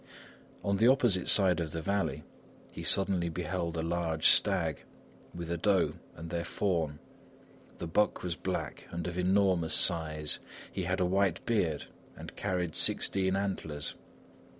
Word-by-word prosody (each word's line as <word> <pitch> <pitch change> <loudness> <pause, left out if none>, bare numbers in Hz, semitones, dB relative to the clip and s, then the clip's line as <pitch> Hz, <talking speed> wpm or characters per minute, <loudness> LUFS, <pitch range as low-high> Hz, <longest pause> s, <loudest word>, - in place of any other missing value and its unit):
On 100 -1 0
the 115 - +4
opposite 120 -8 +3
side 95 -3 +6
of 80 -2 -4
the 80 - -3
valley, 95 -7 -1 0.5
he - - -8
suddenly 95 -3 +1
beheld 85 0 -3
a 80 - -2
large 85 -1 +1
stag, 90 -7 +2 0.5
with 85 -1 -7
a 85 - -1
doe 95 -1 +2 0.2
and 80 +1 -9
their 85 -1 -2
fawn. 85 -8 -1 0.8
The - - -5
buck 105 +6 0
was 90 -2 -2
black - - -4
and 85 0 -5
of 90 -1 -4
enormous 90 -2 +2
size; 75 -3 +2 0.3
he - - -3
had - - -1
a 90 - +2
white 95 -1 0
beard 90 -10 0 0.3
and - - -10
carried 90 -5 -2
sixteen 95 -1 +2
antlers. 95 -7 -1
90 Hz, 150 wpm, -30 LUFS, 80-95 Hz, 0.8 s, side